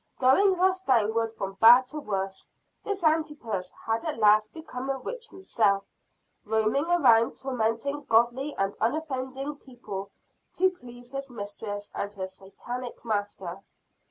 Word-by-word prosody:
Going 370 +10 +4
thus 370 +1 +2
downward 225 - +2
from 195 -2 -6
bad 245 +3 +8
to 305 - -4
worse, 195 -6 -4 0.3
this 400 -3 -3
Antipas 295 - 0
had 225 0 0
at 315 -6 -3
last 215 0 +4
become 275 -5 -7
a 270 - 0
witch 470 - -7
himself; 210 - +1 0.6
roaming 220 +6 +1
around 235 -10 +4
tormenting 265 +3 -2
godly 240 +6 +2
and 195 0 -1
unoffending 270 +1 -2
people 210 -8 -8 0.4
to 375 +1 +3
please 245 -6 -13
his 275 0 -5
mistress 205 -2 -6
and 200 - -3
her 190 -1 -3
Satanic 235 +7 -8
master. 205 -4 -3
240 Hz, 130 wpm, -27 LUFS, 210-285 Hz, 0.6 s, bad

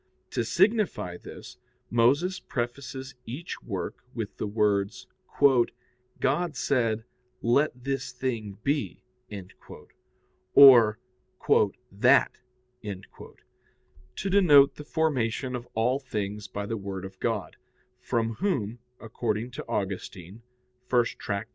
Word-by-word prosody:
To - - 0
signify 205 - +1
this, - - -11 0.3
Moses 140 +11 +3
prefaces 130 +2 -5
each 140 +10 -6
work - - -5
with - - -4
the - - -3
words, 100 -2 0 1.1
"God 150 +3 0
said, 115 -4 0 0.4
Let 125 +1 +2
this 135 +1 -2
thing 115 -6 -4
be," 140 +1 -1 1.5
or 120 -6 +9 0.9
"that," 120 +8 +4 0.5
to 100 - -10
denote 150 -8 +6
the 150 - -9
formation 130 -5 -1
of 120 -1 -6
all 125 +4 +2
things 105 -5 -4
by 100 0 -5
the 115 +2 -3
Word 95 -2 -6
of 95 0 -11
God, 105 -8 -2 0.4
from 115 -2 -1
Whom, 120 - -2 0.2
according 115 +1 -3
to 125 - -7
Augustine 95 0 -4 0.8
[*Tract. 100 +2 -3
120 Hz, 100 wpm, -27 LUFS, 105-135 Hz, 1.5 s, or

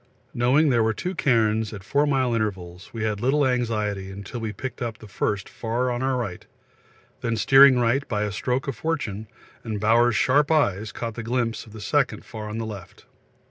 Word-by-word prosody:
Knowing 135 +5 +3
there 120 -2 +3
were 110 -1 +1
two 180 - -3
cairns 110 - +1
at 100 -3 -8
four 145 +8 +1
mile 130 -4 +1
intervals, 95 -5 -3
we 115 -2 -4
had 105 -2 -1
little 140 +3 +2
anxiety 105 -6 -1
till 120 - -6
we 110 -1 -3
picked 130 +3 -7
up 115 -2 -3
the 110 - -13
first 100 0 -2
far 120 +2 -2
on 120 0 -2
our 130 -1 +1
right, 100 -8 -5 0.7
then 115 -1 -1
steering 135 +2 +7
right 125 +4 +1
by 105 -2 -1
a 105 - -2
stroke 125 +6 -2
of 135 - -2
fortune, 110 -6 -3 0.4
and 110 -3 -4
Bowers' 115 +2 +3
sharp 140 +7 +3
eyes 110 - +1
caught 115 -1 -5
a - - -2
glimpse 115 0 -2
of - - -14
the 110 - -10
second 135 +5 0
far 110 -2 -7
on 105 - -5
the 115 - -3
left. 105 -4 -9
115 Hz, 200 wpm, -24 LUFS, 105-130 Hz, 0.7 s, steering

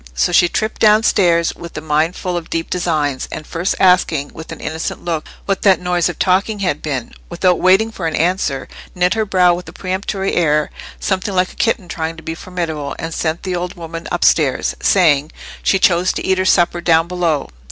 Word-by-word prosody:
So 60 - +1
she 175 - +5
tripped 215 +5 -2
down 215 0 +5
stairs 170 -6 +3
with 170 -2 -10
a - - -1
mind 155 +3 0
full 180 -1 -3
of 170 -2 -5
deep 165 0 -3
designs, 155 -7 -1
and 155 - -6
first 170 +4 -2
asking 175 -6 +3
with 160 +1 -10
an 165 - -8
innocent 160 +1 -5
look 165 -3 -2 0.2
what 195 -1 -1
that 195 -2 +4
noise 180 -1 0
of 175 - -6
talking 195 +3 +1
had 180 -7 -1
been, 135 -6 -4 0.2
without 180 +1 +1
waiting 195 +5 +4
for 180 -6 -4
an 160 - -2
answer, 165 -5 0 0.3
knit 180 0 +2
her 220 -1 0
brow 180 -3 +4
with 180 +1 -6
a - - -12
peremptory 190 +1 -3
air, 150 -3 +1 0.3
something 190 0 -2
like 185 0 +1
a - - -22
kitten 220 -5 0
trying 165 -1 -4
to 160 - -11
be 160 - -4
formidable, 165 -5 -4
and 165 0 -5
sent 160 +1 -2
the 185 -2 -2
old 180 +1 -4
woman 165 0 -7
upstairs; 155 -5 +2
saying, 155 -6 +3 0.3
she 195 - +2
chose 180 -1 +3
to - - -4
eat 190 0 +1
her 185 - +1
supper 175 -1 +3
down 165 -1 +3
below. 170 -5 -1
175 Hz, 205 wpm, -17 LUFS, 160-185 Hz, 0.3 s, she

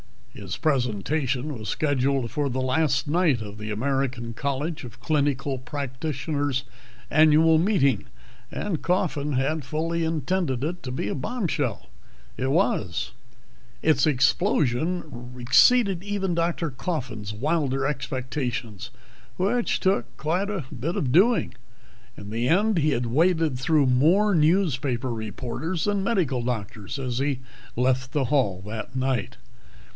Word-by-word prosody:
His 95 -3 -6
presentation 135 +1 0
was 110 -2 -6
scheduled 135 -4 0
for 145 -2 -1
the 130 +1 -2
last 135 0 +1
night 155 -6 +2
of 105 0 -8
the 105 0 -5
American 125 +1 -1
College 140 +5 -3
of 120 0 -10
Clinical 140 -2 0
Practitioners' 140 0 -3 0.5
annual 155 +1 +5
meeting, 150 - +2 0.4
and 190 -7 -3
Coffin 155 -5 0
had 140 +4 0
fully 165 +3 -1
intended 160 -3 -1
it 175 +4 -3
to 130 - -5
be 125 -5 -2
a - - -1
bombshell. 145 - -2 0.5
It 130 +1 -1
was. 135 - 0 0.7
Its 155 -2 +4
explosion 140 - +1
exceeded 195 - +4
even 195 -2 -2
Dr. 170 -1 0
Coffin's 130 - -4
wilder 135 +2 0
expectations, 130 -6 -3 0.5
which 230 +6 +1
took 190 +2 0
quite 180 +6 -1
a 195 -6 -2
bit 150 +8 -3
of 130 - 0
doing. 210 - +4 0.6
In 100 0 -9
the 115 +2 0
end 200 +4 +3
he 155 0 +2
had 120 -2 0
waded 160 +1 +2
through 150 +1 +3
more 165 +12 +4
newspaper 145 -7 +2
reporters 120 - -4
than 205 -2 0
medical 170 - +1
doctors 110 -2 -4
as 125 -2 -2
he 135 -2 -1 0.3
left 130 +1 +1
the 145 -3 +1
hall 115 -9 +1
that 110 +4 -6
night. 130 -1 -1
140 Hz, 130 wpm, -25 LUFS, 125-165 Hz, 0.7 s, annual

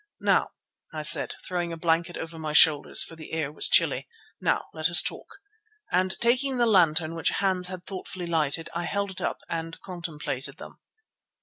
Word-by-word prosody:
"Now," - - +2 0.4
I - - -5
said, 425 - +4
throwing 175 -2 -3
a 165 - -6
blanket 165 +1 0
over 165 0 -7
my 155 -1 -4
shoulders, 150 -1 +6
for 165 - -8
the 160 -1 -11
air 155 -3 -2
was 150 - 0
chilly, - - +3 0.3
"now - - 0
let 155 +1 -1
us 170 - +8
talk," - - -4 0.5
and 185 +1 0
taking 255 +3 +1
the 240 - +3
lantern 165 -6 +3
which 165 - 0
Hans 190 -2 0
had 180 -1 -8
thoughtfully 185 -2 -7
lighted, 160 -1 0
I 170 +1 -3
held 200 +1 -2
it 185 - -9
up - - -3
and 165 0 -5
contemplated 160 -7 -5
them. - - -12
170 Hz, 180 wpm, -26 LUFS, 160-185 Hz, 0.5 s, us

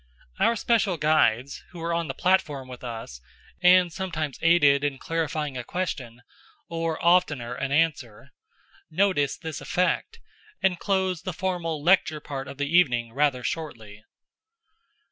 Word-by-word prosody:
Our 230 - +3
special 215 -5 +1
guides, 145 -4 +1
who 175 - -13
were 170 0 -2
on 170 -1 -1
the 135 - -5
platform 150 -8 +1
with 125 -1 -10
us, 115 - -7 0.4
and 180 -1 +5
sometimes 165 -7 -4
aided 145 -4 +4
in 145 -2 -1
clarifying 155 -2 -3
a - - -5
question 120 -8 -5 0.4
or, 165 -1 -2
oftener, 145 -9 +2
an 135 +2 -3
answer, 140 -8 -1 0.6
noticed 160 -5 +1
this 160 -3 -5
effect, 200 - -1 0.4
and 180 -2 +1
closed 190 -3 0
the 185 -1 -4
formal 170 -4 -3
lecture 170 -3 +3
part 135 -2 -6
of 135 - -9
the 145 +3 -1
evening 120 -9 +3
rather 140 -2 +1
shortly. 110 -11 -6
155 Hz, 140 wpm, -25 LUFS, 135-180 Hz, 0.6 s, and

